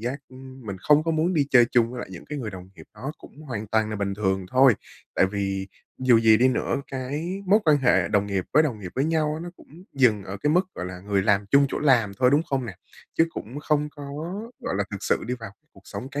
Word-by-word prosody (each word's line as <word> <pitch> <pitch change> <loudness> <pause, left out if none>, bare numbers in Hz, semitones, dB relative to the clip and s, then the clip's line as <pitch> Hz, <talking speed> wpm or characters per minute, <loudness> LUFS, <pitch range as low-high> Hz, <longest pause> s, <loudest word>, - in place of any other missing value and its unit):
giác 125 +5 -3 0.5
mình 100 -3 -5
không 150 +9 +4
có 165 - 0
muốn 165 +3 +1
đi 145 -3 +2
chơi 125 -2 +7
chung 120 -1 +3
với 125 - -7
lại - - -7
những 85 - -9
cái 150 - -6
người 115 -5 -4
đồng 95 -1 -10
nghiệp - - -14
đó 130 +8 -6
cũng 155 - -14
hoàn 115 -7 -5
toàn 110 +1 +1
là 105 - -3
bình 100 -1 -2
thường 95 -2 -1
thôi. 130 -1 +6 0.4
Tại 95 - +4
vì 95 -1 -2 0.4
dù 125 -3 +6
gì 110 -1 +6
đi 125 +3 +4
nữa 130 - -1
cái 150 +9 -4
mối 205 +4 +5
quan 155 -3 +5
hệ 125 -2 +3
đồng 100 -1 +1
nghiệp 95 -2 -1
với 155 +3 +6
đồng 125 -9 -2
nghiệp 90 -3 -7
với 135 - +1
nhau 155 -1 +1
á 160 - -5
nó 175 - -6
cũng 170 +5 -16
dừng 115 -7 +3
ở 95 - -6
cái 150 +9 0
mức, 180 +4 +3
gọi 90 - -5
là, 90 0 -8
người 100 0 0
làm 100 0 +2
chung 140 0 +5
chỗ - - -3
làm 120 -8 +3
thôi, 125 -1 +4
đúng 145 +3 +4
không 135 -5 -2
nè? 105 - -7 0.4
Chứ 165 - +5
cũng 130 -2 -7
không 150 0 0
có, 145 0 -10 0.6
gọi - - -2
là, 100 - 0
thực 100 - -4
sự - - 0
đi 125 - -1
vào 115 -4 -8 0.2
cuộc - - -18
sống 130 - -7
cá 145 +1 -4
125 Hz, 265 wpm, -25 LUFS, 100-150 Hz, 0.6 s, chơi